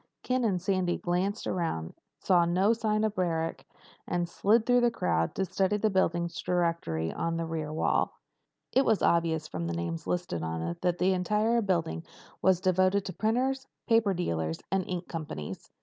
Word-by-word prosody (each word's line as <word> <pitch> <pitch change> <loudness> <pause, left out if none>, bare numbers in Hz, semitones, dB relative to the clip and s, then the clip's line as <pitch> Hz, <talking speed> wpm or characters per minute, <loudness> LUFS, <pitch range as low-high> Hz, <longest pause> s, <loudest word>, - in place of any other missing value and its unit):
Ken 255 0 0
and 195 -6 +1
Sandy 185 -1 0
glanced 185 +5 -1
around, 160 - -2 0.2
saw 175 -2 +3
no 185 +6 +3
sign 215 -2 0
of 215 -1 +1
Barrack, 165 -4 -1 0.4
and 175 -1 0
slid 215 +6 +2
through 245 0 +4
the 240 - +4
crowd 80 - 0
to 190 - 0
study 190 +3 +1
the 215 +1 +1
building 170 -2 +1 0.2
directory 165 - 0
on 165 0 -2
the 165 - -2
rear 160 -2 -3
wall. 155 - 0 0.5
It 265 - +4
was 220 -5 +2
obvious 165 -2 +2
from 85 - -4
the 85 - -2
names 85 -1 -4
listed 175 - -2
on 80 0 -3
it 85 +1 -4
that 180 -1 +1
the 185 +1 +3
entire 210 +5 +2
building 170 - -1 0.4
was 190 -2 +4
devoted 185 +1 +2
to 185 - -5
printers, 260 +4 0 0.2
paper 225 -4 +3
dealers, 80 - -1
and 190 -1 +2
ink 180 -1 -3
companies. 150 - -6
180 Hz, 175 wpm, -29 LUFS, 160-205 Hz, 0.5 s, through